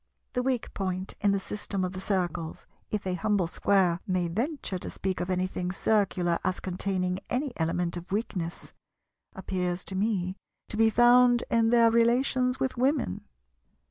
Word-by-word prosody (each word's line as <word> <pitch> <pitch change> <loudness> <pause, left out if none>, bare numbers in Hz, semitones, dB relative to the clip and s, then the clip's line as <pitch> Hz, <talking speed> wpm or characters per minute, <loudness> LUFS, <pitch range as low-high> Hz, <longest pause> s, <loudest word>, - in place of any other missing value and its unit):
The 250 - +1
weak 255 -2 -1
point 185 -1 -3
in 200 - +3
the 200 - +1
system 195 0 -3
of 180 - -4
the 185 - -6
Circles—if 180 +2 -3
a 185 - -1
humble 200 0 +1
Square 180 0 +2
may 185 -2 +1
venture 230 - -2
to - - -5
speak 190 -1 -3
of 180 - -3
anything 180 -1 -1
Circular 185 -4 +1
as 185 - 0
containing 185 0 -1
any 260 +1 -1
element 170 +1 0
of 175 +1 -9
weakness—appears 180 -1 -5
to 190 - -4
me 190 -2 0 0.3
to - - -4
be 225 0 +5
found 240 +1 +5
in 230 -1 +3
their 230 -1 +5
relations 250 +2 +2
with 260 -1 -1
Women. 260 - 0
195 Hz, 150 wpm, -28 LUFS, 180-230 Hz, 0.3 s, be